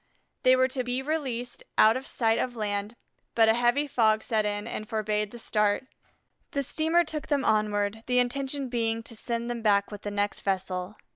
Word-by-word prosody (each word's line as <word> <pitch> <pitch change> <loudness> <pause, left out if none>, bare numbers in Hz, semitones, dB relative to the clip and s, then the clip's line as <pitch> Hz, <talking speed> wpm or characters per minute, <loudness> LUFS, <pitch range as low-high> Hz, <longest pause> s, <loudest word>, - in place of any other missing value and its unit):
They 255 0 +6
were 260 0 +4
to 255 -1 -2
be 245 +2 -2
released 265 -5 -3 0.2
out 220 +1 +6
of 260 +1 -5
sight 225 -1 +1
of 245 -1 -2
land, 205 0 -2 0.4
but 225 -1 +5
a 220 - +6
heavy 240 +5 +2
fog 220 -6 +2
set 215 -2 0
in 205 0 -2
and 215 -2 -5
forbade 210 -1 -1
the 240 - -10
start. 210 0 +1 0.7
The 280 - 0
steamer 320 +5 +2
took 305 -2 -5
them 280 -2 +1
onward, 210 0 +1
the 250 -1 +2
intention 270 +2 0
being 230 -2 -1
to 230 - -8
send 235 +1 -3
them 240 -1 -3
back 200 -2 +2
with 205 -1 -7
the 205 - -4
next 205 0 -1
vessel. 190 0 -2
230 Hz, 195 wpm, -27 LUFS, 210-255 Hz, 0.7 s, They